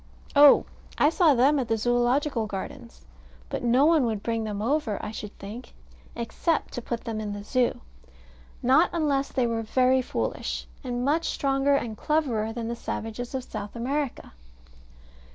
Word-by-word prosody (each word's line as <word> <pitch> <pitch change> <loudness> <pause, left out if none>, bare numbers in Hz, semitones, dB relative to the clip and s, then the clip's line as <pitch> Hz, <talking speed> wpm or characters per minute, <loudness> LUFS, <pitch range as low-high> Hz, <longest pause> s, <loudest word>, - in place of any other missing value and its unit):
Oh, 285 0 +8 0.3
I 295 - +4
saw 325 -4 +4
them 275 +4 +4
at 250 - -2
the 225 - +1
Zoological 240 +1 +1
Gardens. 230 +5 -8 0.4
But - - -3
no 245 +4 +4
one 320 -3 +4
would 215 -2 -3
bring 230 -1 -1
them 210 -2 -4
over, 235 -1 0
I - - -5
should 210 -1 -8
think, 215 +6 -9 0.4
except 240 +8 -1
to 245 - -4
put 235 0 -4
them 225 -2 -4
in 205 -1 -4
the 205 0 -6
Zoo. 250 +3 0 0.8
Not 270 +8 +5
unless 285 -5 0
they 255 -3 +1
were 230 -1 -1
very 255 +3 +3
foolish. 255 - -3 0.2
And 245 -1 -2
much 315 +4 +1
stronger 275 0 +1
and 230 -5 -2
cleverer 240 -6 0
than 230 0 -4
the 235 - -3
savages 235 +2 -5
of 260 - -2
South 205 -3 -7
America. 270 - -3
245 Hz, 165 wpm, -26 LUFS, 225-280 Hz, 0.8 s, Oh